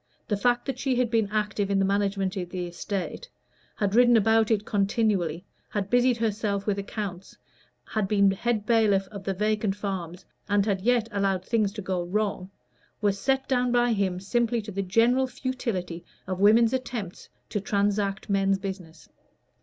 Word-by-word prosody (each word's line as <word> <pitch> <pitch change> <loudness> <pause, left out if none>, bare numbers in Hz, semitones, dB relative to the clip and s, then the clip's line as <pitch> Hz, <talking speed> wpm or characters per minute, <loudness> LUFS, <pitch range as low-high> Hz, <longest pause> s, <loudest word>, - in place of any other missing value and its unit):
The 210 - +1
fact 240 +4 +1
that 265 -2 -4
she 265 -2 0
had 245 -2 +1
been 225 -3 +2
active 210 -2 -1
in 200 - +2
the 195 - +3
management 195 -1 0
of 180 -3 -4
the 180 -1 -4
estate 195 - -5 0.5
had 200 -3 -1
ridden 240 0 +6
about 220 +1 +3
it 210 -2 +1
continually, 195 -4 0 0.2
had 200 -2 -3
busied 245 0 +3
herself 210 -3 -1
with 200 -2 0
accounts, 195 -2 -6 0.5
had 215 -3 -1
been 200 -1 +4
head 215 +1 -1
bailiff 215 -4 +3
of 200 -2 -8
the 195 - -1
vacant 210 0 0
farms, 190 -3 -5 0.2
and 205 -1 +3
had 200 -3 0
yet 235 +1 +2
allowed 195 -2 0
things 215 -4 +1
to 210 - -6
go 185 -1 -1
wrong 195 0 -2 0.5
was 200 -2 0
set 265 +2 0
down 250 -2 +1
by 240 -1 +3
him 190 -3 0
simply 235 +4 0
to 210 - -7
the 195 0 -2
general 230 +7 +3
futility 225 -11 -4 0.2
of 185 0 -4
women's 225 +4 +5
attempts 240 -8 -4 0.2
to 205 - -2
transact 200 0 0
men's 195 -1 +2
business. 185 -5 -8
205 Hz, 170 wpm, -26 LUFS, 195-230 Hz, 0.5 s, ridden